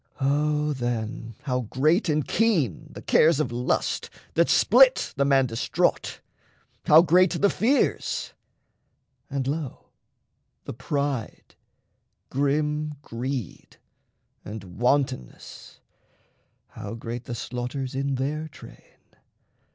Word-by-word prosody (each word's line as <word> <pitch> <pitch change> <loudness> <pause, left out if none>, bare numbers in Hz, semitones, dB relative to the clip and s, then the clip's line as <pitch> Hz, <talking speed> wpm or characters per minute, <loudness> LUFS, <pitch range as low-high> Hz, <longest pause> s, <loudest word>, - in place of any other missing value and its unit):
O 150 +2 +1
then 115 -2 -4
how 125 -3 -1
great 155 - +1
and 150 -1 0
keen 175 - +1
the - - -10
cares 155 -1 +4
of 130 -6 -1
lust 120 +1 -1 0.2
That - - +3
split - - +5
the 140 - +1
man 135 -1 +4
distraught! 115 -2 -1 0.7
How 155 +2 +8
great 180 +1 +4
the 200 - +4
fears! 255 +7 0 1.0
And 140 -2 -2
lo, 145 0 -5 0.7
the - - -5
pride, 135 0 -3 0.8
grim 150 +2 0
greed, 125 -2 -5 0.7
and 100 -3 -9
wantonness 125 - -2 0.9
How 110 -1 -7
great 115 +1 -6
the 120 - -5
slaughters 125 +2 -4
in 135 +1 -1
their 150 +4 -2
train! 150 - -15
135 Hz, 105 wpm, -25 LUFS, 120-150 Hz, 1.0 s, How